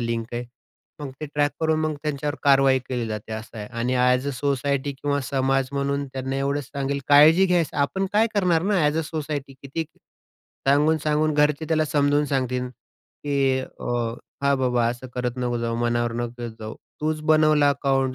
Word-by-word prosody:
Link 115 -1 -2
आहे. 120 +1 -3 0.6
मग 145 -2 -5
ते 155 - -4
ट्रॅक 145 0 +2
करून 160 -1 +2
मग 155 -1 0
त्यांच्यावर 150 -1 -2
कारवाई 135 -2 +5
केली 125 -3 -2
जाते 110 0 -5
असं 110 +1 -7
आहे 105 - -6
आणि 125 +2 0
ॲज 125 +1 +2
अ, - - 0
सोसायटी 140 +1 -1
किंवा 140 +1 -2
समाज 135 -1 +1
म्हणून 140 0 -1
त्यांना 135 0 -3
एवढंच 140 +1 -1
सांगेन 140 +1 -3
काळजी 155 +6 +7
घ्यायचं 175 -6 +1
आपण 190 +7 0
काय 215 +2 +4
करणार 180 -5 +2
ना? 205 +3 +1
ॲज 150 +2 +2
अ, - - +3
सोसायटी 150 -3 -4
किती 140 +4 -3 0.8
सांगून-सांगून 150 +1 +2
घरचे 150 +1 +2
त्याला 155 -1 +2
समजावून 145 0 +2
सांगतील, 125 -2 -1
की 135 +2 -3
अ, 130 - -10 0.6
हां, 140 0 +3
बाबा 125 -2 +1
असं 120 +2 -5
करत 125 -1 -1
नको 120 -1 -1
जाऊ, 115 0 -2
मनावर 120 0 0
नको 120 0 -5
घेत 120 - -4
जाऊ. 110 0 -6 0.3
तूच 155 0 -1
बनवला 155 -2 +5
अकाउंट, 135 -1 0
140 Hz, 175 wpm, -24 LUFS, 125-150 Hz, 0.8 s, काळजी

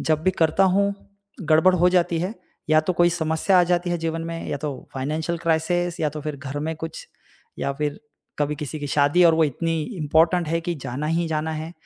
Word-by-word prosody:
जब 155 -1 0
भी 185 - +3
करता 170 +1 +2
हूँ, 200 +2 +2 0.5
गड़बड़ 160 +3 +4
हो 180 0 +4
जाती 175 -2 +2
है 185 +6 -2 0.4
या 155 0 +6
तो 155 +4 -1
कोई 175 0 +3
समस्या 165 +3 +1
आ - - +4
जाती 175 0 0
है 175 - 0
जीवन 165 0 -3
में, 165 0 -5
या - - -2
तो 140 -2 -6
फाइनेंशियल 155 +5 -2
क्राइसिस 175 +2 0
या 155 - +2
तो 150 +1 -7
फ़िर 150 -1 -5
घर 140 0 -6
में 160 +2 -2
कुछ - - -7 0.5
या 140 - -1
फ़िर 145 +1 -3 0.4
कभी 150 0 0
किसी 150 +1 -5
की 145 - -3
शादी 145 +5 +3
और 165 -1 +6
वो 160 0 +4
इतनी 160 +3 -1
इम्पोर्टेन्ट 165 +2 +2
है 165 +1 0
कि 170 +1 -3
जाना 140 0 -5
ही 165 +2 0
जाना 160 0 -2
है। 160 +1 -5
160 Hz, 220 wpm, -23 LUFS, 150-175 Hz, 0.5 s, या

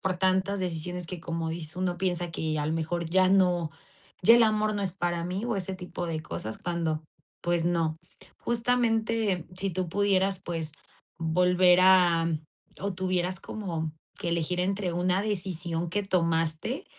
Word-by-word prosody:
por 185 -1 -1
tantas 190 +2 +2
decisiones 180 -1 -2
que, 175 0 -6
como 165 -1 -3
dice 160 +1 -4
uno, 180 -1 -1
piensa 175 -2 -1
que 155 -1 -2
a 150 - -1
lo 155 - 0
mejor 165 +1 -2
ya 185 +2 +4
no 180 -4 +3 0.5
ya 230 +6 +8
el 240 - +6
amor 215 -1 +2
no 205 - -2
es 185 -3 -2
para 175 -2 -1
mí 185 +5 -3
o 240 -1 -1
ese 190 0 -2
tipo 180 -1 -5
de 160 -1 -2
cosas, 110 -7 -5
cuando, 165 -3 -2 0.4
pues 175 -1 +1
no. 165 -2 +1 0.4
Justamente 230 -5 +1
si 195 +1 +1
tú 185 0 -2
pudieras, 195 0 +1
pues, 165 -3 -2 0.5
volver 180 +2 +4
a 180 -3 +5 0.5
o 200 0 -2
tuvieras 185 0 -1
como 165 -7 -4 0.3
que - - -3
elegir 170 +1 -1
entre 190 0 -1
una 180 +2 +1
decisión 175 -4 -2
que 205 +5 -1
tomaste, 165 - 0
180 Hz, 165 wpm, -28 LUFS, 165-190 Hz, 0.5 s, ya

